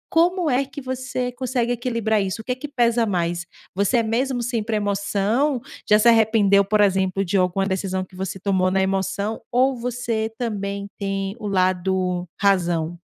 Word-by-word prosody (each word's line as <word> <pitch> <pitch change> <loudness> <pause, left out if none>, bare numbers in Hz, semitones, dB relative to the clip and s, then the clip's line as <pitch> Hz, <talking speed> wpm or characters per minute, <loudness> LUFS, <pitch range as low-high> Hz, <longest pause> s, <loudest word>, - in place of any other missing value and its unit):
Como 350 +1 +3
é 265 -1 +2
que 275 +1 -9
você 255 -1 -3
consegue 245 -1 -1
equilibrar 230 -3 0
isso? 195 +3 -3
O - - -46
que 250 - -1
que 275 +4 -7
pesa 240 -4 +2
mais? 175 -4 -1 0.3
Você 200 +6 +1
é 230 - +3
mesmo 245 +2 -1
sempre 230 -2 -1
emoção? 210 +6 0 0.3
Já 210 - +7
se 215 +2 +3
arrependeu, 220 -3 +5
por 210 +2 +2
exemplo, 190 -1 +2
de 185 +3 -2
alguma 185 +1 +2
decisão 190 -1 -2
que 185 - -18
você 190 0 -4
tomou 185 -1 +1
na 190 +1 +1
emoção, 195 +2 -1
ou 260 +2 +3
você 235 -2 -2
também 200 -4 -3
tem 195 0 -2
o 215 - -5
lado 185 -1 0
razão? 175 -4 +1
205 Hz, 170 wpm, -22 LUFS, 190-240 Hz, 0.3 s, Já